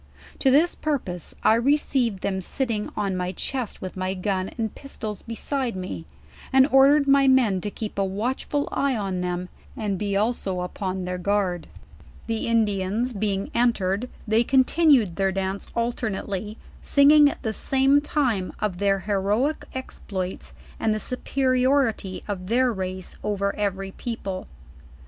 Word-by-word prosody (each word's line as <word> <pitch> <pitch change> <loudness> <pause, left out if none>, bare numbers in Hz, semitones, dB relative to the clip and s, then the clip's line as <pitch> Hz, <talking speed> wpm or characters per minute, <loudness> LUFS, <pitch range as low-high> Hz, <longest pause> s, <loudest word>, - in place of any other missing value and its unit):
To 270 - +3
this 305 +6 +4
pur 305 -2 0
pose, 180 - -7
I - - +6
received 240 -4 +1
them 190 -1 -1
sitting 225 +1 -2
on 200 -3 0
my 180 0 -2
chest 250 +2 -4
with 185 - -6
my 185 0 -2
gun 185 0 -1
and 220 -3 -2
pistols 220 -7 -6
beside 240 +1 -2
me, 185 -3 -6 0.4
and 265 0 +6
ordered 280 +2 +6
rny 275 -1 +5
men 230 -8 +3
to 205 - -3
keep 210 -1 -5
a - - +3
watchful 245 +9 -2
eye 275 -3 +1
on 190 -3 -2
them 180 0 -3 0.3
and 205 -4 -2
be 200 -1 0
also 200 -4 -1
upon 185 0 -3
thuir 180 0 -3
guard. 190 -3 0 0.6
"The 225 -1 -2
Indians 220 +1 +1
being 200 -2 -2
entered 230 -1 +1 0.2
they 220 +2 +3
continued 265 - +4
their 195 -1 +2
dance 195 +1 -3
alternately, 215 -3 -2 0.2
singing 290 +1 +6
at - - -8
the 220 - -1
same 270 +4 +3
time 250 -11 0
of 190 -4 -2
their 195 -1 +2
heroic 210 - 0
exploits, 190 -7 -5 0.2
and 220 -1 +1
the - - -2
superiority 255 -4 0
of 185 -3 -4
their 245 +3 +2
race 185 -1 -5
over 200 -1 -1
every 195 -2 -2
people. 195 -5 -5
210 Hz, 150 wpm, -24 LUFS, 190-255 Hz, 0.6 s, I